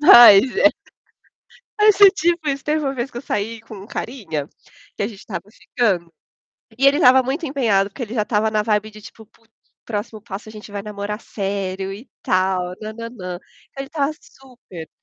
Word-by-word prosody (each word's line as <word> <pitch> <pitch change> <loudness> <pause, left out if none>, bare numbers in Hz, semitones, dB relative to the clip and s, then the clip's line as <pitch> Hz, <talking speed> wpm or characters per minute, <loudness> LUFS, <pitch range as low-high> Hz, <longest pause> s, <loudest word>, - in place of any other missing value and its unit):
Mas 240 -7 +10
é 300 - +5 1.1
Mas 420 -1 +5
é 400 - +11
tipo 340 -4 0
isso, 275 -1 -3
teve 305 +1 0
uma 270 - -1
vez 255 0 -4
que 235 - -8
eu - - -5
saí 225 -1 -3
com 205 -3 -11
carinha, 200 - -5 0.5
que - - -2
a - - 0
gente 210 -4 -11
estava 205 - -6
ficando, 190 -9 -1 0.7
e 275 - +4
ele 275 +1 +5
estava 260 -4 +6
muito 275 +7 -3
empenhado, 220 -8 +1
porque 250 - -8
ele 230 0 -5
já 220 - +1
estava 215 0 0
na 215 -1 +1
vibe 210 0 0
de 215 0 -14
tipo 220 +1 -13
"Putz, 225 0 -31 0.3
próximo 215 0 -5
passo 210 0 -8
a - - -10
gente 210 -1 -11
vai 200 - -4
namorar 210 +1 -5
sério 195 -2 -4
e 210 +7 -11
tal 185 -1 0
nãnãnã". 215 -4 -7
Então - - -29 0.4
ele 275 - -4
estava 285 -1 -1
super 240 - -13
220 Hz, 190 wpm, -21 LUFS, 200-265 Hz, 1.1 s, é